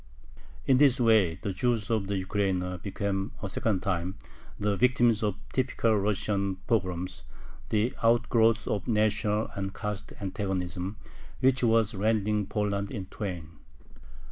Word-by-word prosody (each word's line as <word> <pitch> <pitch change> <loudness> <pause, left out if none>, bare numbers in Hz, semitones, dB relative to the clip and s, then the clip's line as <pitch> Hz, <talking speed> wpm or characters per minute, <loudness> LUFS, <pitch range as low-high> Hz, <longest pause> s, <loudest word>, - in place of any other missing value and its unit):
In 130 - +4
this 135 -2 +5
way 110 -8 +4
the 100 - -2
Jews 115 +1 0
of 110 -4 0
the 100 - -1
Ukraina 95 -2 -1
became 100 0 -2
a - - -1
second 100 -1 0
time 90 -2 -1 0.4
the 105 0 +1
victims 120 -1 +3
of 105 -3 0 0.2
typical 120 -3 +1
Russian 100 -1 0
pogroms, 90 -5 -1 0.5
the 110 +3 +1
outgrowth 115 -1 +3
of 100 - -2
national 105 -1 +1
and 95 0 -4
caste 105 0 -4
antagonism, 95 -1 -3 0.4
which 130 0 +3
was 115 -1 +3
rending 105 0 +1
Poland 100 -1 -1
in 100 -7 -5
twain. 85 -6 -6
105 Hz, 130 wpm, -28 LUFS, 95-115 Hz, 0.5 s, this